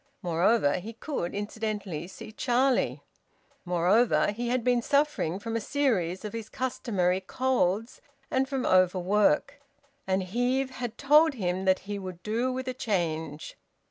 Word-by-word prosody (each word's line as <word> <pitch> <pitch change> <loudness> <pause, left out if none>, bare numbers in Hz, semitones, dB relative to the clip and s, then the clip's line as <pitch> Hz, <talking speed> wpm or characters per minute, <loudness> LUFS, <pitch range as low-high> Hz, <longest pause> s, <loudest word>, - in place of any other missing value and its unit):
Moreover, 175 -1 +2
he 220 +6 -8
could 225 - -4
incidentally 205 -5 -4
see 190 - -10
Charlie. 250 +3 +1 0.6
Moreover, 180 +7 +3
he 235 +3 -3
had 250 -1 0
been 245 0 +2
suffering 280 - +1
from 225 +3 -5
a 230 - 0
series 205 -9 0
of 210 - -5
his 225 -1 -6
customary 190 -8 -1
colds, 225 -1 0 0.3
and 265 0 +1
from 270 -2 -2
overwork, 200 +11 +2 0.5
and 190 0 +1
Heve 250 +7 0
had 245 -3 -5
told 300 +2 +5
him 185 -3 -2
that 190 0 +3
he 205 0 -4
`would 185 -2 -8
do 235 +4 0
with 260 0 -4
a 255 - -1
change.' 160 - -3
215 Hz, 140 wpm, -28 LUFS, 185-255 Hz, 0.6 s, told